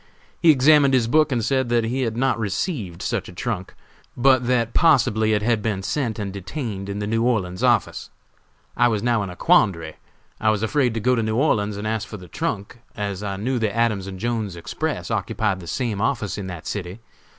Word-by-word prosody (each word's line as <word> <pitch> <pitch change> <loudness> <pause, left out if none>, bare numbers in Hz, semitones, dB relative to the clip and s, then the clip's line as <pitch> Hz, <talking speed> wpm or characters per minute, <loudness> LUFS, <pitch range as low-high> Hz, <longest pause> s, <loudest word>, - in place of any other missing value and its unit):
He 170 - +5
examined 145 -1 +6
his 125 -3 +3
book 155 +3 +3
and 120 -4 0
said 130 -3 +1
that 120 -1 +2
he 125 +4 -1
had 115 -3 -2
not 130 -1 +1
received 100 - -3
such - - -2
a - - -11
trunk, 95 0 -4 0.4
but 130 -1 +4
that 120 -2 +1
possibly 115 -9 +3
it 105 0 +1
had 115 -1 +1
been 100 -3 -2
sent 120 -1 -2
and 100 -3 -4
detained 100 - -5
in 100 - -4
the 105 - -3
New 115 +2 0
Orleans 110 -6 0
office. 120 -5 +1 0.7
I 120 - +4
was 110 -3 -1
now 120 -3 +2
in 100 - -4
a 90 - -8
quandary; 85 -4 +2 0.4
I 110 - +2
was 110 0 0
afraid 125 0 +1
to - - 0
go 125 +4 +2
to 120 - +1
New 110 0 -1
Orleans 105 -7 +1
and 105 - -5
ask 110 0 -2
for 105 - -8
the 90 -2 -12
trunk, 100 +8 -4 0.2
as 100 -3 -3
I 100 -2 -3
knew 125 +5 -1
the 110 -2 -1
Adams 110 -5 +1
and 95 -1 -7
Jones's 110 -4 -2
Express 85 - -4
occupied 105 -4 -1
the 85 - -10
same 110 +1 -2
office 110 -5 -1
in 100 -2 -5
that 90 -3 -7
city. 95 0 -5
110 Hz, 215 wpm, -22 LUFS, 100-125 Hz, 0.7 s, examined